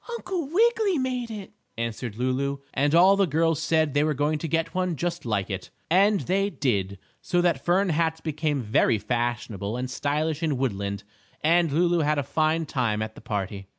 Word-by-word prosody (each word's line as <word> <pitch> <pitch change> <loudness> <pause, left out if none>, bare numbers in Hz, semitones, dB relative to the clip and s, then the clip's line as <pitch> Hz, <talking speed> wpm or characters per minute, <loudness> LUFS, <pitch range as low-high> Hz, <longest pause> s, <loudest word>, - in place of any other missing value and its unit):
"Uncle 365 -10 -4
Wiggily 435 -1 +3
made 255 -3 -2
it," 210 -3 -8 0.2
answered 115 -1 -4
Lulu, 130 +3 -1 0.2
and 145 +3 +2
all 185 +3 +7
the 195 -1 +2
girls 165 0 +1
said 160 -3 +1
they 145 +1 +3
were 155 -1 0
going 150 +2 0
to 165 - -3
get 165 +1 -1
one 185 -2 0
just 170 +2 -3
like 100 -4 0
it. 95 -1 -5 0.2
And 200 +2 +4
they 195 +2 0
did, 100 - -1 0.2
so 175 - 0
that 170 -6 +1
fern 185 +2 +2
hats 160 0 0
became 150 -3 -2
very 110 +1 +2
fashionable 120 -1 -2
and 125 0 -4
stylish 150 +3 -1
in 155 -5 0
Woodland, 100 -5 -2 0.4
and 165 0 +3
Lulu 170 +3 +2
had 150 -1 +1
a 145 - 0
fine 160 +3 0
time 115 -7 -1
at 110 0 -6
the - - -13
party. 100 -3 -4
150 Hz, 185 wpm, -25 LUFS, 120-175 Hz, 0.4 s, all